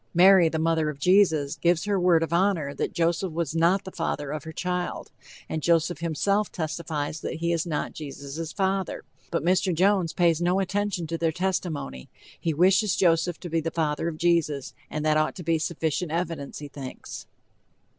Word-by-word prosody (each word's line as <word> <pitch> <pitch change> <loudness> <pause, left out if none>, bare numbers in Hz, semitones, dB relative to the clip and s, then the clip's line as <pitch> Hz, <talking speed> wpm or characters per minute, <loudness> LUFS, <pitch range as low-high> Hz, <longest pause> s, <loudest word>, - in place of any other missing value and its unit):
Mary, 180 -1 +7
the 160 - -2
mother 160 -1 +1
of 150 - -6
Jesus, 160 -4 +3
gives 170 0 +2
her 205 -2 +1
word 175 -2 +4
of 165 - -3
honor 170 -6 +1
that - - -2
Joseph 170 +1 0
was 165 -2 -2
not 170 +4 +3
the 190 - -8
father 145 -4 -3
of 150 -1 -5
her 160 - -6
child, 180 +2 -3 0.4
and 160 - -3
Joseph 170 +1 +2
himself 195 +6 0
testifies 155 -2 -3
that - - -4
he 170 +1 -1
is 170 +1 -1
not 150 -3 -2
Jesus' 150 +2 -6
father, 190 -2 -1 0.3
but 165 -4 -1
Mr. 185 +1 +2
Jones 185 0 +2
pays 170 -2 +2
no 180 +2 +2
attention 195 -2 -1
to 165 +1 -4
their 165 -1 +1
testimony; 160 - -3 0.3
he 165 - 0
wishes 185 +5 +3
Joseph 170 -1 +2
to 175 - -6
be 165 - +2
the 165 - -2
father 160 -1 -1
of 165 -2 -4
Jesus, 160 -5 +1 0.2
and 155 0 -3
that 155 0 +3
ought 155 0 +1
to 180 - -7
be 165 0 +1
sufficient 160 0 -2
evidence, 165 -4 -3
he 145 - -7
thinks. 135 -2 -8
165 Hz, 185 wpm, -26 LUFS, 155-180 Hz, 0.4 s, Mary